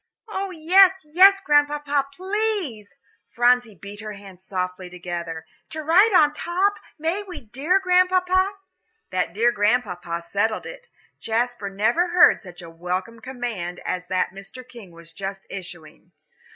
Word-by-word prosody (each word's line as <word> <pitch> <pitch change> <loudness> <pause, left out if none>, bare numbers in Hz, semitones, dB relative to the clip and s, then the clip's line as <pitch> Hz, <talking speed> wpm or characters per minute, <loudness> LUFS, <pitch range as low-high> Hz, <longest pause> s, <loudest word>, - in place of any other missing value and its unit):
"Oh, 395 -2 -4
yes, 370 +2 +4
yes, 385 +5 +6
Grandpapa, 290 -3 +1
please" 380 - -3 0.3
Phronsie 245 -2 +2
beat 200 +4 -11
her 215 -1 -7
hands 195 -2 -13
softly 185 -1 -4
together 170 -2 -6 0.2
"to 315 0 -6
ride 370 +8 +5
on 300 -6 +5
top; 370 +6 0 0.2
may 330 +6 -1
we, 385 -3 -9
dear 275 - 0
Grandpapa?" 370 +1 +2 0.6
That 180 -2 -1
"dear 230 +6 +2
Grandpapa" 200 -6 -1
settled 210 +5 -1
it. - - -10 0.3
Jasper 230 -2 -2
never 220 - +1
heard 350 0 +5
such 180 -3 -12
a 170 - -10
welcome 180 +7 -4
command 225 -8 -5
as 180 0 -3
that 185 +1 0
Mr. 195 +6 -12
King 235 -7 -13
was 165 -1 -15
just 195 +1 -6
issuing. 175 -3 -10
240 Hz, 140 wpm, -23 LUFS, -, 0.6 s, yes